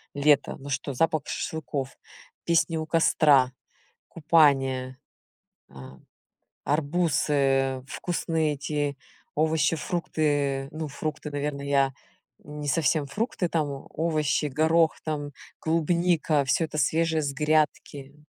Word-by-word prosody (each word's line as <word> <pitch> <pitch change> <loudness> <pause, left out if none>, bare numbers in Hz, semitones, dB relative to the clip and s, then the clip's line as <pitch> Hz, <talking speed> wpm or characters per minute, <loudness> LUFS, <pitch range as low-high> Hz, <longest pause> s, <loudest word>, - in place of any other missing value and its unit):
лета. 145 0 +3
Ну 140 +1 -9
что: 140 +1 -3
запах 155 +2 +1
шашлыков, 140 -3 -4 0.5
песни 165 0 +2
у 155 - -3
костра, 145 -5 +4 0.6
купание, 135 -5 +2 0.7
ам, 65 -1 -13 0.6
арбузы, 140 -4 +1
вкусные 160 -3 -1
эти 145 0 -2 0.4
овощи-фрукты. 155 -3 0
Ну, 155 -1 -4
фрукты, 150 +1 -5
наверно, 145 0 -3
я 140 -1 +2 0.5
не 150 0 -7
совсем 150 0 +1
фрукты, 205 - -2
там 155 -3 0
о 135 -1 -8
овощи, 155 -2 0
горох, 160 +3 +2
там 145 -2 -3 0.3
клубника, 165 -2 +1
всё 140 +5 +1
это 155 - -5
свежее 160 +2 +1
с 140 -1 -2
грядки. 150 -2 0
150 Hz, 105 wpm, -26 LUFS, 140-160 Hz, 0.7 s, костра